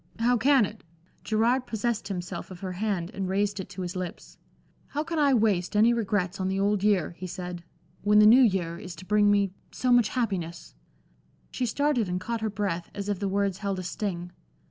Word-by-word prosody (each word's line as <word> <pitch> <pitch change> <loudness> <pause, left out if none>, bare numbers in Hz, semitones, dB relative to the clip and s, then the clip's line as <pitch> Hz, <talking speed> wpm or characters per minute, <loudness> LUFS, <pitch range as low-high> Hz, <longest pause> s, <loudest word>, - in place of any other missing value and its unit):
"How 240 +2 +3
can 265 -1 +4
it?" 210 +2 -10 0.4
Gerard 235 +4 +1
possessed 225 0 -2
himself 180 -3 -5
of 185 -2 -10
her 190 -1 -4
hand 185 -2 -2
and 190 -3 -3
raised 200 +1 0
it 185 - -6
to 190 -2 -6
his 180 +1 -5
lips. 185 -1 -7 0.5
"How 295 +2 -2
can 330 0 -3
I 280 -3 +4
waste 210 -5 +1
any 225 +3 +5
regrets 200 -4 -1
on 185 - -1
the 190 +1 -1
Old 200 0 +1
Year," 200 -7 +2
he 185 - -5
said, 180 -1 -6 0.4
"when 210 +1 +4
the 210 - +8
New 235 +5 +8
Year 180 -7 +1
is 180 -2 -8
to 185 - -11
bring 210 +1 +3
me 200 -2 +3 0.2
so 255 - 0
much 240 -3 +5
happiness?" 185 -9 -3 0.8
She 250 - -1
started 255 -4 +1
and 180 0 -1
caught 230 +4 -3
her 220 - 0
breath, 190 -4 -3
as 200 0 -4
if 200 -3 -1
the 200 - -1
words 195 -1 0
held 200 -2 -2
a 185 - -4
sting. 175 -1 -4
200 Hz, 210 wpm, -27 LUFS, 185-225 Hz, 0.8 s, the